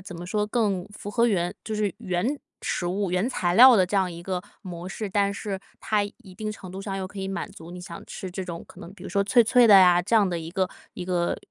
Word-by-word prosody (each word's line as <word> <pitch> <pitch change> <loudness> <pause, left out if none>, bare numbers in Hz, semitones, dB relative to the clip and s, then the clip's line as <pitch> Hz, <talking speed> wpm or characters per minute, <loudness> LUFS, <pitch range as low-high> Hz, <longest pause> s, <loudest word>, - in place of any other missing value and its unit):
怎 185 -2 -9
么 175 - -7
说？ 210 +2 0
更 205 -5 0
符 205 0 -8
合 235 +1 +3
原 175 -5 0
就 220 - -4
是 210 -3 -1
原 190 +11 -1 0.2
食 175 - -2
物 190 +1 -1
原 185 +7 +1
材 175 -8 0
料 250 +2 +9
的 185 - +5
这 185 - -5
样 185 -2 +2
一 170 0 -9
个 180 -1 -3 0.2
模 175 -1 -7
式， 210 +2 -5
但 200 0 +2
是 200 -2 -4 0.2
它 210 -1 +1
一 200 -2 -9
定 215 0 -4
程 185 -3 -9
度 190 - -6
上， 195 -1 -4
又 190 -1 -3
可 200 +1 -11
以 190 0 -3
满 195 -3 -4
足 165 +1 -11
你 180 - -8
想 170 -1 -9
吃 185 - -7
这 190 +1 -5
种 170 -2 -7
可 - - -15
能 175 - -10
比 190 - -15
如 - - -6
说 200 - +2
脆 235 +3 +4
脆 245 +1 +5
的 205 -2 +9
呀， 180 -1 +6
这 225 +6 +1
样 205 -3 +4
的 175 - -2
一 165 0 -7
个 185 +1 0 0.3
一 180 - -5
个 175 -1 0
190 Hz, 290 characters per minute, -25 LUFS, 180-210 Hz, 0.3 s, 料